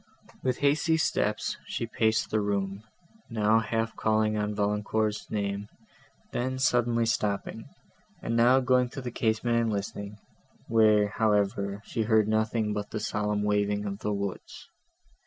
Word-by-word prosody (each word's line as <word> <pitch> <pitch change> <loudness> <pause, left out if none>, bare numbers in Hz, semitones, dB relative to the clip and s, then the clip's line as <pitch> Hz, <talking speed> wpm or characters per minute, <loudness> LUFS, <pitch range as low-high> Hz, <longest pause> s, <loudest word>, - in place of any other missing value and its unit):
With 130 -1 0
hasty 160 +3 +3
steps 105 -8 0
she - - -3
paced 110 -1 0
the 110 - +2
room, 100 -1 -2 0.5
now 110 -1 +3
half 115 0 -2
calling 110 0 +1
on 105 0 -1
Valancourt's 105 +1 -1
name, 100 -1 -2 0.6
then 130 +2 -2
suddenly 120 -3 +2
stopping, 105 -3 -2 0.5
and 115 - -3
now 125 +3 +5
going 125 -1 +2
to 135 - -7
the 120 - -4
casement 115 +1 +1
and 115 -1 0
listening, 100 0 -4 0.5
where, 105 -2 +4
however, 100 -2 0
she 115 - -3
heard 110 -1 +3
nothing 110 0 0
but 105 -1 -4
the 110 - -4
solemn 105 -1 -1
waving 105 0 0
of 100 0 -4
the 105 - -2
woods. 100 -2 -5
110 Hz, 140 wpm, -28 LUFS, 105-115 Hz, 0.6 s, now